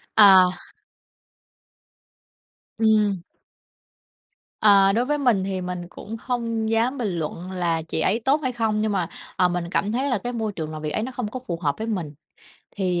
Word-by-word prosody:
À! 190 -4 +8 2.3
Ừm. 210 -5 +2 1.4
Ờ, 200 -2 +6
đối 240 +3 +1
với 295 +1 +1
mình 240 -9 +2
thì 190 -1 -3
mình 180 -1 -5
cũng 220 +4 -8
hông 230 -3 -2
dám 230 +4 +1
bình 230 -6 -1
luận 170 +4 -5
là 170 -3 0
chị 160 0 -4
ấy 210 +8 +2
tốt 285 +3 +3
hay 255 - 0
không, 220 -3 0
nhưng 215 - 0
mà, 180 -4 -1 0.3
ờ, 180 - +3
mình 175 -1 -3
cảm 200 +3 0
thấy 265 +5 0
là 250 - +1
cái 245 +5 -5
môi 220 -2 -2
trường 155 -3 -5
làm 155 -1 -7
việc 155 - -3
ấy 215 - -2
nó 260 - -4
không 245 -4 -4
có 255 +4 -6
phù 170 -2 -2
hợp 145 -4 0
với 220 +1 -4
mình. 175 -9 -3 0.6
Thì, 180 -3 0
205 Hz, 185 wpm, -23 LUFS, 180-230 Hz, 2.3 s, À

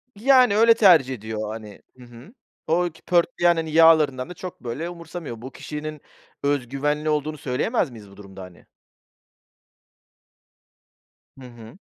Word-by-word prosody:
Yani 250 -1 +4
öyle 230 +1 +6
tercih 170 - +5
ediyor, 110 -1 -6
hani, 110 -1 -9 0.2
hı 125 - -14
hı. 120 - -15 0.3
O 175 +2 +1
ki 160 - -20
pörtleyen 175 -1 +2
hani 160 -1 -4
yağlarından 155 -5 +4
da - - -7
çok 180 +1 -9
böyle 130 +8 -5
umursamıyor. 170 -8 -9
Bu 130 +2 -9
kişinin 150 +2 -7 0.4
öz 140 -3 0
güvenli 150 +3 -2
olduğunu 150 0 -2
söyleyemez 145 - -1
miyiz 110 -5 -13
bu 100 - -17
durumda 95 -1 -12
hani? 90 -1 -15 2.7
Hı - - -11
hı. 120 +4 -14
150 Hz, 140 wpm, -23 LUFS, 120-170 Hz, 2.7 s, öyle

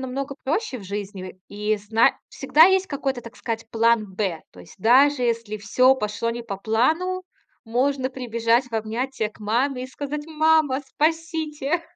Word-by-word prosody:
намного 270 +2 -4
проще 300 - -2
в - - -11
жизни. 195 -1 -6
И 210 +1 -1
в - - -12
и - - -18
зна 225 +1 +3
всегда 315 +2 +5
есть 380 0 +3
какой-то, 270 -3 -2
так 230 +1 -12
сказать, 225 -1 -4
"план 230 -1 +3
Б". 190 -5 -2
То 90 - -18
есть, - - -14
даже, 255 +5 +4
если 230 -3 -1
всё 255 +6 +4
пошло 210 -1 -2
не 235 0 -5
по 200 -4 -5
плану, 320 - 0 0.4
можно 260 +3 0
прибежать 235 -1 +1
в 240 - -19
объятия 225 +1 -2
к - - -21
маме 250 +5 0
и - - -6
сказать: 290 +3 -6
"Мама, 315 -3 +2
спасите!" 320 0 -1
250 Hz, 170 wpm, -23 LUFS, 220-285 Hz, 0.4 s, всегда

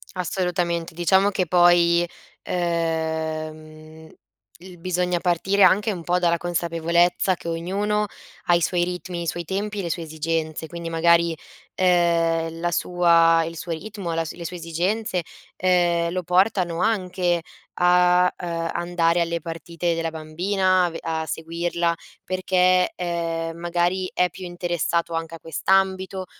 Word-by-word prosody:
Assolutamente. 175 -2 -2
Diciamo 190 +4 +3
che 190 -2 -1
poi, 175 0 +4 0.4
ehm, 160 -2 -3 0.5
l 180 0 -12
bisogna 180 0 0
partire 185 +3 +1
anche 210 +3 +5
un 180 -4 -5
po' 175 +2 +1
dalla 170 -1 +2
consapevolezza 170 +1 +1
che 170 - -11
ognuno 200 +5 -1 0.4
ha 175 - +4
i 170 - +1
suoi 175 +1 +1
ritmi, 180 0 -5
i - - -5
suoi 175 +1 -2
tempi 205 +4 -3
e - - 0
le 170 - -3
sue 170 - -3
esigenze. 160 0 -3
Quindi 170 0 -6
magari, 170 0 +3 0.4
ehm, 165 -2 +2
la 175 +1 -1
sua 165 -1 +4
il 165 +1 -6
suo 170 - -6
ritmo, 195 -1 -5
la 165 0 -1
le 170 +2 -8
sue 180 +2 -5
esigenze, 180 +4 -1 0.4
ehm, 175 -2 +2
lo 180 0 -2
portano 180 -1 +1
anche 180 -4 0 0.4
a, 180 0 +4
ehm, 165 -1 -3
andare 170 0 +1
alle 170 0 -1
partite 165 +1 -3
della 165 0 -2
bambina, 180 +4 +1
a - - -1
ve 165 - -7
a 160 -1 -2
seguirla, 170 +1 -1 0.3
perché, 185 0 +2
ehm, 165 -2 -3
magari 175 +2 0
è 180 0 +1
più 185 +1 -9
interessato 175 -1 -2
anche 165 0 -4
a - - -11
quest'ambito 190 +3 0
175 Hz, 140 wpm, -23 LUFS, 165-180 Hz, 0.5 s, anche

